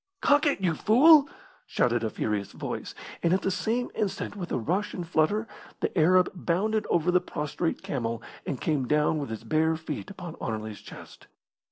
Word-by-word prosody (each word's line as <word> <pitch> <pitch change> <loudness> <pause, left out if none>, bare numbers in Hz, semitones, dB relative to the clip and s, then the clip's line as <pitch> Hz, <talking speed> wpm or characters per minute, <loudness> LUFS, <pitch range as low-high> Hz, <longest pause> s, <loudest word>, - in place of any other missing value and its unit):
"Cock 290 +2 +4
it, 285 - +1
you 175 -3 +2
fool!" 280 - +6 0.4
shouted 120 -1 +1
a 110 - 0
furious 105 -1 -3
voice; - - -5 0.3
and 170 0 +2
at 190 - -2
the 195 - +1
same 230 +6 -1
instant, 200 -1 -3
with 180 -4 -6
a - - +1
rush 190 - -1
and 175 -3 -5
flutter, 195 +7 +1 0.3
the - - -2
Arab 180 +2 +5
bounded 195 +5 0
over 175 +1 +2
the 180 0 +3
prostrate 150 +3 -3
camel 115 -4 -2 0.2
and 135 - -4
came 145 -5 0
down 150 +2 +2
with 140 - -4
his 110 -1 -6
bare 155 +7 +2
feet 160 +4 -6
upon 175 -4 -8
Anerley's 110 -1 -4
chest. - - -13
170 Hz, 180 wpm, -27 LUFS, 140-200 Hz, 0.4 s, fool